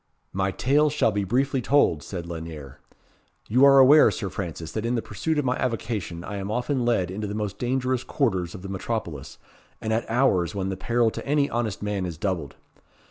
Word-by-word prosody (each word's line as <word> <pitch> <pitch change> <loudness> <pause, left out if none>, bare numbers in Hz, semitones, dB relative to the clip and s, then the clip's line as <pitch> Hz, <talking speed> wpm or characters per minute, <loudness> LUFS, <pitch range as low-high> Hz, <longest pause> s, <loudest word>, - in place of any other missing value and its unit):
"My 95 0 0
tale 145 +9 +2
shall 145 -6 +2
be 100 -1 -1
briefly 130 +6 0
told," 120 - +3
said 85 +3 -6
Lanyere. 80 -5 -8 0.7
"You 125 +5 +3
are 135 0 +7
aware, 140 +3 +8
Sir 100 - -4
Francis, 85 -3 -5
that 110 - -3
in 120 +1 0
the 115 - 0
pursuit 155 - -2
of 145 - 0
my 125 0 +1
avocation 110 -8 -3
I 100 - -5
am 100 0 -4
often 125 +3 -1
led 95 -7 +1
into 105 +2 -4
the 100 - -4
most 105 -2 -4
dangerous 130 0 0
quarters 95 - -1
of 95 - -10
the - - -6
metropolis, 95 - -4 0.4
and 110 - -2
at 115 - -1
hours 110 -8 +2
when 95 -1 -2
the 95 - -2
peril 115 +3 +1
to - - -6
any 145 0 +1
honest 115 -4 -2
man 100 -3 -2
is 85 -3 -6
doubled. 85 -6 -3
105 Hz, 200 wpm, -25 LUFS, 95-125 Hz, 0.7 s, aware